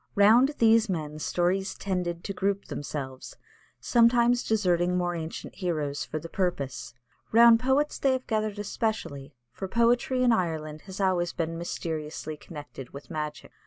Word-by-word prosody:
Round 235 +8 +5
these 225 -1 +4
men 155 -4 -3
stories 180 +4 0
tended 180 -3 -3
to 200 - -4
group 200 +1 -1
themselves, 135 -3 -6 0.4
sometimes 240 0 +4
deserting 180 -4 +1
more 175 -1 0
ancient 165 -1 -6
heroes 155 -6 -2
for 155 - -4
the 160 +2 -6
purpose. 145 -9 -3 0.4
Round 230 0 +7
poets 265 +4 +1
have - - -17
they 260 -2 +3
gathered 215 -2 -1
especially, 200 -10 -3 0.2
for 190 +9 -6
poetry 240 +4 +2
in 245 - +5
Ireland 160 -6 -1
has 190 +1 -8
always 180 -3 +1
been 165 0 -2
mysteriously 160 -2 -4
connected 145 -4 -10
with 140 +4 -11
magic. 150 -2 -5
180 Hz, 145 wpm, -27 LUFS, 155-225 Hz, 0.4 s, Round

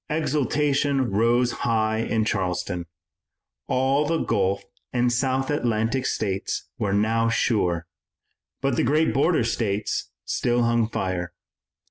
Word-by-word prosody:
Exultation 145 -3 +1
rose 120 +4 +3
high 110 -2 0
in 110 -1 0
Charleston. 90 -4 -2 0.8
All 135 +3 +2
the 165 +1 +1
Gulf 100 -7 0 0.3
and 120 -1 +1
South 130 +2 0
Atlantic 120 -1 0
States 95 -3 -2
were 100 - 0
now 110 +3 +2
sure, 90 -8 +1 0.8
but 135 -3 0
the - - +2
great 150 0 +2
border 145 +2 +3
states 110 -3 -1 0.2
still 120 0 +1
hung 115 -1 +2
fire. 90 -4 -3
115 Hz, 115 wpm, -24 LUFS, 105-135 Hz, 0.8 s, rose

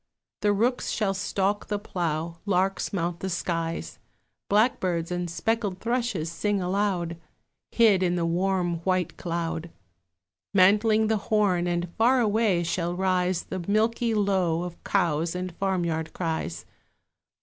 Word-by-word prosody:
The 210 - +3
rooks 235 +5 +1
shall 205 -4 0
stalk 200 +1 -1
the 205 - -1
plough, 170 -4 -3
larks 195 0 +1
mount 175 -2 -2
the 190 - -3
skies, 165 -2 -3 0.5
Blackbirds 185 -6 +1
and 175 0 -2
speckled 200 +3 -1
thrushes 230 -9 -1
sing 205 +4 0
aloud, 180 -2 -1 0.5
Hid 215 -5 +4
in 180 -1 +2
the 170 -1 0
warm 175 0 0
white 185 +1 -1
cloud 170 -1 -3 0.9
Mantling 210 +3 +5
the 220 -1 +1
thorn, 195 -5 +1
and 175 0 -2
far 250 +3 +5
away 215 -5 +2
shall 170 +1 -1
rise 185 -1 +1
The 185 -2 -5
milky 225 +2 +1
low 190 -5 +1
of 175 -1 -8
cows 165 +1 0
and 180 -1 -4
farm 190 -3 0
yard 160 -1 -2
cries. 160 - -3
185 Hz, 135 wpm, -26 LUFS, 170-205 Hz, 0.9 s, Mantling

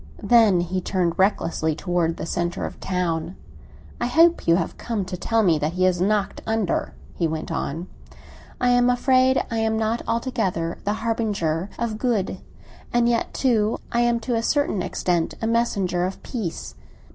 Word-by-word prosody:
Then 220 -7 +5
he 185 +2 -2
turned 180 -2 -1
recklessly 165 -5 +1
toward 175 -1 -1
the - - -4
centre 175 +2 -2
of - - -5
the - - -12
town. 175 -1 -1 0.6
"I 240 - 0
hope 330 +6 +4
you 165 - +6
have 185 - -2
come 220 -5 -2
to 180 - -5
tell 225 +5 +1
me 165 -5 +3
that 150 +2 -1
he 185 +1 0
has 180 -1 +2
knocked 200 0 0
under," 220 -5 -1 0.2
he 170 - 0
went 160 0 -4
on. 165 +5 -3 0.7
"I 250 - +2
am 245 0 +4
afraid 255 +1 +3
I 225 - 0
am 220 0 +1
not 220 +1 0
altogether 220 -8 -1
a 205 - +2
harbinger 210 -7 -1
of 225 -2 -3
good; 225 -6 0 0.5
and 240 0 +3
yet, 235 -1 0
too, 225 -4 +1
I 235 - +1
am 240 -1 +2
to 245 +2 -2
a 225 - +1
certain 260 -6 +1
extent 175 -2 -1
a - - -3
messenger 200 -6 +1
of 190 - -8
peace. 210 -10 -5
205 Hz, 175 wpm, -23 LUFS, 175-235 Hz, 0.7 s, you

